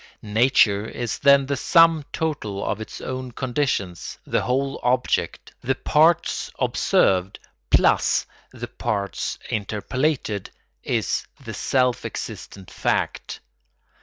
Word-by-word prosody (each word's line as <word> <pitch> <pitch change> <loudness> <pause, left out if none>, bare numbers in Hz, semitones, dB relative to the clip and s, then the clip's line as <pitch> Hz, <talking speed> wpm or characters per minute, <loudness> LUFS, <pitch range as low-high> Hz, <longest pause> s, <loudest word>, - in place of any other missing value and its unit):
Nature 110 -2 +3
is 120 0 -4
then 140 -1 +5
the 140 +1 -1
sum 165 +2 +4
total 125 -11 -3
of 105 - -2
its 110 - -8
own 130 -1 -5
conditions; 120 - -2
the - - 0
whole 135 +5 -1
object, 125 +1 0
the 135 +2 0
parts 155 +5 +2
observed 95 +1 +2 0.3
plus - - +3 0.3
the - - -7
parts 100 -2 -3
interpolated, 110 +1 -2 0.3
is - - -1 0.2
the - - -6
self 125 -2 +1
existent 95 -2 -7
fact. - - -2
125 Hz, 105 wpm, -23 LUFS, 105-140 Hz, 0.3 s, then